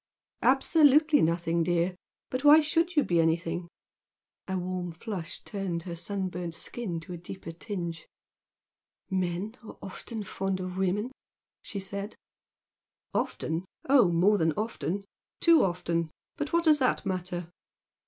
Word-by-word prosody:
"Absolutely 295 +2 +5
nothing, 170 +1 +1
dear! 175 +2 +1 0.4
But 255 +1 -2
why 295 +2 +9
should 330 +3 +1
you 295 - +5
be 170 -1 +2
any 165 0 +3
thing?" 170 +1 -4 0.8
A 190 -1 -1
warm 180 -1 -3
flush 175 -2 -6
turned 185 -5 -3
her 170 -1 -5
sunburnt 180 -2 -3
skin 180 0 -3
to 170 +3 -8
a - - -5
deeper 175 0 -8
tinge. 170 -2 -5 1.0
"Men 185 +3 -1
are 220 - -10
often 215 +3 -6
fond 195 -1 -2
of 185 0 -4
women" 195 +6 0 0.5
she 200 - -6
said. 200 +2 -6 1.0
"Often? 160 +3 -1 0.2
Oh, 255 -9 +6
more 195 +5 +4
than 160 -1 +2
often! 200 -2 -3 0.3
Too 335 -2 +6
often! 170 -2 0 0.3
But 295 -1 -3
what 335 0 +3
does 310 -3 +5
that 255 -5 +1
matter?" 180 -2 -3
185 Hz, 135 wpm, -29 LUFS, 170-225 Hz, 1.0 s, why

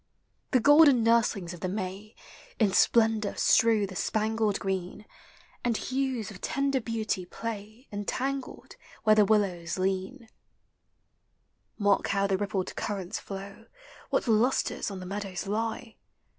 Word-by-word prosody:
The 255 - +3
golden 285 -1 +6
nurslings 225 -6 +2
of 175 - -10
the 185 - -3
May 195 +2 -5 0.4
In 205 -4 +2
splendor 220 -3 +3
strew 225 -3 +4
the 190 -1 -9
spangled 215 0 0
green, 190 +1 -4 0.6
And 235 -2 +1
hues 260 -5 -2
of 190 - -12
tender 275 0 0
beauty 220 -4 -2
play, 220 +5 -7
Entangled 260 +6 -4 0.3
where 215 -1 +5
the 210 -1 +5
willows 190 -6 0
lean. 190 0 -1
THE - - -14
SEASONS. 225 -1 -20 1.5
93 210 - -6
Mark 200 -1 +3
how 200 0 +1
the 195 -1 +1
rippled 195 -2 -3
currents 195 -4 -4
flow; 200 +3 -9 0.4
What - - 0
lustres 230 +3 +1
on 195 -2 -6
the - - -7
meadows 195 -1 -5
lie! 220 +2 -3
210 Hz, 140 wpm, -28 LUFS, 195-230 Hz, 1.5 s, golden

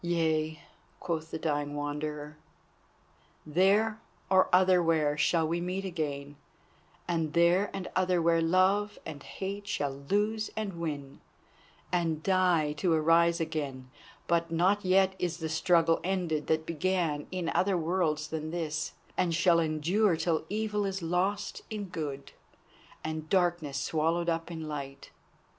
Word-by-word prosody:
"Yea," 160 -2 0 0.4
quoth 160 -2 -3
the - - -4
dying 145 -2 -2
Wanderer; 150 +1 -4 1.1
"there 200 +7 +3 0.3
or 190 0 +5
otherwhere 170 -5 +4
shall 160 +2 +2
we 170 +2 -1
meet 185 +2 -3
again, 145 -5 -4 0.7
and 165 -3 -1
there 175 +4 +4
and 195 -2 -5
otherwhere 175 -3 +3
love 190 +5 +2
and 150 -3 -7
hate 200 +5 -6
shall 145 -9 -1 0.2
lose 215 +2 +1
and 210 -3 -2
win, 145 -4 -5 0.7
and 165 -3 0
die 180 -5 +2
to 160 +4 0
arise 165 +2 +4
again. 145 -5 -4 0.3
But 170 0 +1
not 185 +5 +2
yet 190 +1 +4
is 175 -2 -1
the 160 -2 -4
struggle 165 0 +3
ended 175 -5 -1
that 160 0 +1
began 165 -2 -1
in 180 -3 -3
other 190 0 +2
worlds 160 -3 0
than 155 -1 -4
this, 160 -2 -3 0.2
and 170 -2 +1
shall 170 0 +4
endure 165 +5 +2
till 160 -1 0
evil 210 0 -1
is 195 -2 -3
lost 185 +5 -1
in 215 -2 -4
good, 145 -5 -5 0.7
and 155 0 -4
darkness 175 -6 +1
swallowed 165 +4 0
up 165 0 -2
in 160 -2 -6
light. 140 -2 -7
165 Hz, 135 wpm, -30 LUFS, 155-185 Hz, 1.1 s, or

